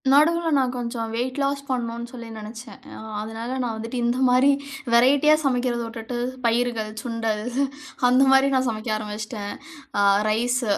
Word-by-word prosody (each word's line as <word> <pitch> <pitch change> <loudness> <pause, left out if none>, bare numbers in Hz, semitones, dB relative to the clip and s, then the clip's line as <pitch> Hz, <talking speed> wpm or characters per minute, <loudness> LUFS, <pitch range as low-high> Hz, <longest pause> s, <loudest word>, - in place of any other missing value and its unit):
நடுவுல 330 +4 +4
நான் 260 -2 +2
கொஞ்சம் 235 -2 -3
வெயிட் 255 +3 -2
லாஸ் 280 0 0
பண்ணணுன்னு 235 -2 -3
சொல்லி 235 -2 -8
நெனச்சேன். 225 +3 -9 0.2
அ - - -9 0.2
அதனால, 225 +2 -6
நான் 230 -2 -2
வந்துட்டு 230 +3 -5
இந்த 240 +2 +1
மாரி 255 +3 +5 0.4
வெரைட்டியா 270 +5 +5
சமைக்கிறத 250 -3 0
உட்டுட்டு, 225 +2 -6 0.3
பயிர்கள், 230 -2 +1
சுண்டல், 225 -3 -2 0.7
அந்த 255 +2 +5
மாரி 270 +1 +6
நான் 260 0 +2
சமைக்க 220 +1 -4
ஆரம்பிச்சுட்டேன். 210 0 -5 0.5
அ - - +4 0.3
ரைஸு 240 +2 0
240 Hz, 145 wpm, -24 LUFS, 225-255 Hz, 0.7 s, மாரி